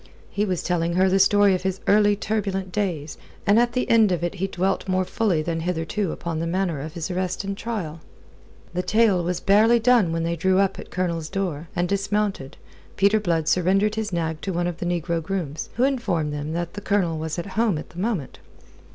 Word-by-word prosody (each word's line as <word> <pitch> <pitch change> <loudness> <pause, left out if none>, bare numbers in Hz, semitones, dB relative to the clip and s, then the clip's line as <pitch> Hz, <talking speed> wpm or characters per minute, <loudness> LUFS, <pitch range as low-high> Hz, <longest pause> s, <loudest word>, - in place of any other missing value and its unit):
He 205 - 0
was 185 -4 -2
telling 170 -1 0
her 190 +2 +3
the 195 +1 +3
story 200 0 +5
of 185 - -1
his 190 0 -2
early 205 0 +4
turbulent 195 -3 -2
days, 175 -7 -3 0.3
and 205 +3 +5
at 240 0 +2
the 250 - 0
end 220 -4 +5
of 175 -1 -1
it 175 - -1
he 195 - +1
dwelt 190 +1 -1
more 185 0 +1
fully 185 -4 0
than 165 0 -2
hitherto 170 +2 -2
upon 165 -2 -4
the 165 - -2
manner 175 -4 -1
of 155 +2 -7
his 170 +1 -4
arrest 185 +1 -2
and 195 0 -3
trial. 195 -8 -4 0.7
The 180 - 0
tale 210 -3 +3
was 175 +1 -1
barely 215 +4 +5
done 230 -6 +4
when 165 0 -1
they 170 +1 -1
drew 185 +3 +2
up 195 -1 +1
at - - -7
the - - -23
Colonel's 170 -3 -2
door, 175 -5 -3
and 175 0 +1
dismounted, 200 -6 -1 0.4
Peter 200 +2 +4
Blood 165 -6 0
surrendering 195 +5 +2
his 220 -2 -3
nag 160 -2 -2
to 195 - -3
one 175 0 -1
of 175 -2 -3
the 175 - -3
negro 170 -1 -1
grooms, 165 -4 -4
who 240 - +1
informed 195 - 0
them 150 +1 -4
that 170 0 -3
the 205 - -7
Colonel 185 -6 0
was 160 0 -3
from 175 +3 -5
home 220 -3 +1
at - - -8
the 175 - -9
moment. 185 - -2
185 Hz, 220 wpm, -24 LUFS, 165-205 Hz, 0.7 s, story